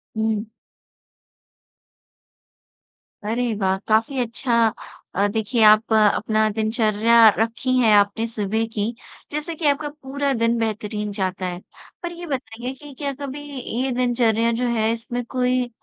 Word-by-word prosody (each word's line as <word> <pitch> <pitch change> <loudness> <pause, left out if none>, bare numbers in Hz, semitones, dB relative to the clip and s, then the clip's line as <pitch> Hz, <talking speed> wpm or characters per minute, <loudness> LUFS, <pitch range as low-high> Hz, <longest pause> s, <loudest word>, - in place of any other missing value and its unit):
हुँ। 220 0 -1 2.8
अरे, 230 +1 0
वाह! 190 0 +1
काफ़ी 225 +5 +2
अच्छा 240 0 -1 0.6
अ, 200 +2 +3
देखिए, 220 +2 -1
आप 215 +1 +6
अपना 215 0 +3
दिनचर्या 220 +1 +4
रखी 230 +3 0
है 230 -3 +4
आपने 205 +2 +2
सुबह 220 0 -1
की, 205 -3 -1 0.5
जिससे 300 +3 -4
कि 310 -2 -1
आपका 290 +1 +1
पूरा 280 -1 -3
दिन 230 0 +1
बेहतरीन 210 -1 -3
जाता 190 -1 -3
है। 175 0 -4 0.4
पर 345 - -3
ये 345 0 -8
बताइए 250 -2 -4
कि 290 -2 -11
क्या 280 -2 -2
कभी 280 +1 -5 0.4
ये 265 - -1
दिनचर्या 235 -2 +2
जो 250 - 0
है, 220 0 +2
इसमें 235 +2 -4
कोई 250 0 0
230 Hz, 135 wpm, -22 LUFS, 215-255 Hz, 2.8 s, आप